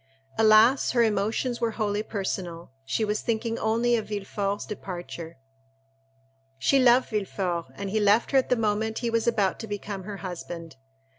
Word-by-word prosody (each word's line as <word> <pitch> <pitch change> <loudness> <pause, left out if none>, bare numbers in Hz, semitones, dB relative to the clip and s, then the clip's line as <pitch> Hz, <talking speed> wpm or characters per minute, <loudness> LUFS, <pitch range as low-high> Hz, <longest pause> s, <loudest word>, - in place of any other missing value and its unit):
Alas, 220 +5 +5
her 240 -2 +4
emotions 220 +3 0
were 230 - +2
wholly 210 -2 0
personal: 185 - -4
she 215 +11 -1
was 210 0 -1
thinking 230 0 -2
only 230 +2 +2
of 220 - -2
Villefort's 200 -1 -3
departure. 175 -5 -7 1.2
She 135 - +3
loved 250 0 +5
Villefort, 190 -5 -2
and 200 -1 -5
he 220 - +1
left 210 +2 +3
her 270 - +5
at 260 - -3
the 250 - +4
moment 220 0 0
he 230 - 0
was 230 0 0
about 200 -5 +1
to 225 - -6
become 200 -2 -5
her 205 -1 -6
husband. 175 -3 -7
210 Hz, 160 wpm, -26 LUFS, 195-230 Hz, 1.2 s, Alas